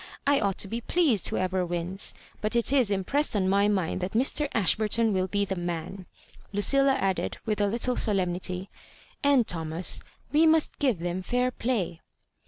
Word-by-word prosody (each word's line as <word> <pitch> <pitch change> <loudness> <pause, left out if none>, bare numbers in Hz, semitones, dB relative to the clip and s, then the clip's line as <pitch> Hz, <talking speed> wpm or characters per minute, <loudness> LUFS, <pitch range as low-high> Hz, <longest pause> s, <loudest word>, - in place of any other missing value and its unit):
I 285 0 +3
ought 195 -2 -1
to - - 0
be 230 +4 -4
pleased 275 - +2
whoeyer 185 0 -1
wins. 175 +2 -2 0.3
But 215 +2 -2
it 235 +3 +3
is 255 -7 +3
impressed 220 +8 0
on 190 -2 +1
my 200 +2 +3
mind 190 -3 -1
that 180 +1 -3
Mr. 270 +5 +2
Ashburton 220 +2 +2
will 185 0 0
be 200 +2 0
the 190 - -3
man," 175 +1 -5 0.4
Lucilla 275 +7 +3
added, 195 -8 -1
with 215 -2 -1
a 205 - +3
little 240 +4 -1
solemnity, 185 -2 -2 0.5
"and, 280 -4 +4
Thomas, 165 +1 0 0.3
we 315 +2 +4
must 320 -1 +2
giye 260 -8 +1
them 175 +2 -3
fair 250 +6 0
play." 220 -10 -2
205 Hz, 170 wpm, -27 LUFS, 185-250 Hz, 0.5 s, and